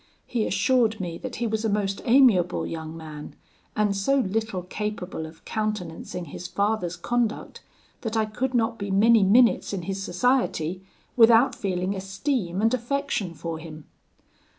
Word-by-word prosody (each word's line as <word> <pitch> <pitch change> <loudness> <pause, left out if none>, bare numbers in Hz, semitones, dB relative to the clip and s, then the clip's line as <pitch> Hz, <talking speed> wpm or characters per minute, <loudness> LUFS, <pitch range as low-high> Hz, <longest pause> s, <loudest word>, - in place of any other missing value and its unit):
He 230 -3 -1
assured 235 -4 +2
me 170 -3 -4
that 260 -1 -6
he 240 - -2
was 220 -1 -1
a 220 - +1
most 200 -1 -1
amiable 230 -9 +4
young 160 0 -6
man, 155 -2 -9 0.4
and 210 -2 +1
so 235 +8 +2
little 215 -5 -1
capable 190 -4 -4
of 160 +1 -16
countenancing 195 -5 -4
his 170 +4 -7
father's 200 -4 -1
conduct, 225 +6 -2 0.4
that 225 -1 -2
I 220 - +2
could 250 +4 -3
not 230 0 +1
be 200 0 -4
many 220 +3 +5
minutes 225 +3 +4
in 185 -3 -3
his 195 +2 -4
society 185 -4 0 0.3
without 235 +2 +6
feeling 190 -5 -2
esteem 195 - -2
and 225 +2 +3
affection 245 -7 -2
for 165 -1 -5
him. 155 -2 -10
210 Hz, 150 wpm, -25 LUFS, 180-230 Hz, 0.4 s, without